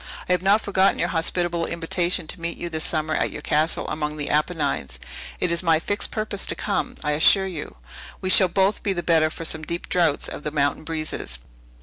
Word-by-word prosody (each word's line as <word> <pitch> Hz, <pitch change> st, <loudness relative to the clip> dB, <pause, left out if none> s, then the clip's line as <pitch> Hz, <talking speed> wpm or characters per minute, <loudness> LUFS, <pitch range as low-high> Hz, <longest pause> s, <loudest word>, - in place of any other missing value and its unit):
I -, -, -1 dB
have 180 Hz, -1 st, +2 dB
not 200 Hz, +3 st, +4 dB
forgotten 195 Hz, -1 st, +2 dB
your -, -, 0 dB
hospitable 170 Hz, 0 st, 0 dB
invitation 170 Hz, +1 st, 0 dB
to 165 Hz, -, -2 dB
meet 170 Hz, 0 st, -4 dB
you 175 Hz, -, -5 dB
this 160 Hz, -1 st, -2 dB
summer 155 Hz, -1 st, -1 dB
at -, -, +1 dB
your -, -, -8 dB
castle 155 Hz, +2 st, 0 dB
among 150 Hz, 0 st, -3 dB
the 145 Hz, -1 st, -2 dB
Apennines. 80 Hz, -, -1 dB, 0.4 s
It 180 Hz, -, +1 dB
is 170 Hz, -, +2 dB
my 165 Hz, -3 st, +3 dB
fixed 205 Hz, +5 st, -2 dB
purpose 215 Hz, -2 st, -1 dB
to -, -, -2 dB
come, 205 Hz, -, -2 dB
I 150 Hz, -, 0 dB
assure 175 Hz, +6 st, +5 dB
you. 175 Hz, -6 st, -6 dB, 0.4 s
We 185 Hz, -, 0 dB
shall 185 Hz, -, +7 dB
both 195 Hz, +3 st, +1 dB
be 200 Hz, -, 0 dB
the 175 Hz, -2 st, -4 dB
better 160 Hz, -2 st, +3 dB
for 165 Hz, +1 st, -7 dB
some 160 Hz, -1 st, -2 dB
deep 170 Hz, +2 st, -5 dB
draughts 170 Hz, -5 st, +1 dB
of -, -, -7 dB
the 150 Hz, -, -3 dB
mountain 145 Hz, +1 st, 0 dB
breezes." 155 Hz, -, -4 dB
165 Hz, 215 wpm, -23 LUFS, 155-180 Hz, 0.4 s, shall